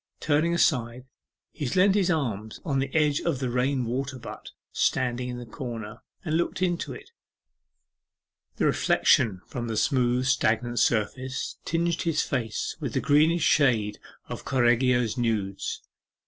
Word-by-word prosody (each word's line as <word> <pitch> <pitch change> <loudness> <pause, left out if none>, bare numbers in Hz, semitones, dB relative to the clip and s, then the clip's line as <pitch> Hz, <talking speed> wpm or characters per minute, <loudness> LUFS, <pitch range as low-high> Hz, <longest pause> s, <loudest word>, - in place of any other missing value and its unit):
Turning 155 +2 +1
aside, 125 -6 +1 0.5
he 145 -5 -4
leant 190 +7 +4
his 195 -2 +2
arms 110 - -2
upon 140 -6 -2
the 135 0 -2
edge 150 -2 +3
of - - 0
the 130 -2 -2
rain 125 +1 0
water 130 +3 -3
butt 125 - -9 0.2
standing 125 0 0
in 125 - -5
the 120 - -7
corner, 115 -2 -7 0.2
and 155 -1 0
looked 170 - -1
into 175 -2 -1
it. - - -10 1.4
The - - 0
reflection 110 -9 +3
from 120 -2 -5
the 110 -1 -3
smooth 125 0 +2
stagnant 120 -2 +1
surface 130 +4 -1
tinged 170 0 0
his 165 -4 +1
face 115 -6 -2
with - - -4
the - - +1
greenish 155 +3 +3
shades 115 -10 +2 0.3
of - - -7
Correggio's 125 -1 +2
nudes. 105 -5 -2
125 Hz, 145 wpm, -26 LUFS, 120-145 Hz, 1.4 s, leant